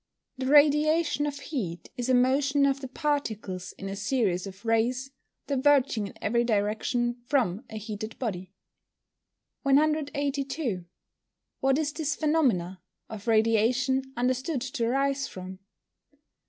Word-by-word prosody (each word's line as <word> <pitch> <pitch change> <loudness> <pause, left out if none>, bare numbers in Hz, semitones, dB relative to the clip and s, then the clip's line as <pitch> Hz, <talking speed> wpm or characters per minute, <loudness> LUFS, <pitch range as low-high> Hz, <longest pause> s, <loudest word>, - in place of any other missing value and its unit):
_ - - -2
The - - -1
radiation 300 +1 +4
of 285 -1 -4
heat 205 - -5
is 245 +1 -3
a 255 - +5
motion 275 +3 +3
of 275 0 +1
the 265 - -5
particles, 225 - -2
in 195 - -8
a 195 - -4
series 200 -4 0
of 195 +3 -11
rays, 245 +4 +1 0.3
diverging 270 -6 +2
in - - -11
every 235 +3 +2
direction 240 +2 0
from 240 -7 +1
a 220 - -6
heated 215 +1 -6
body. 190 -7 -4 1.1
182. 280 - 0 0.8
_What 270 0 +3
is 300 -1 -1
this 300 -2 -1
phenomena 250 - +1 0.3
of 215 0 -8
Radiation 235 +4 +2
understood 255 +3 0
to 245 -2 -2
arise 275 +2 0
from? 185 0 -9
255 Hz, 125 wpm, -27 LUFS, 215-280 Hz, 1.1 s, a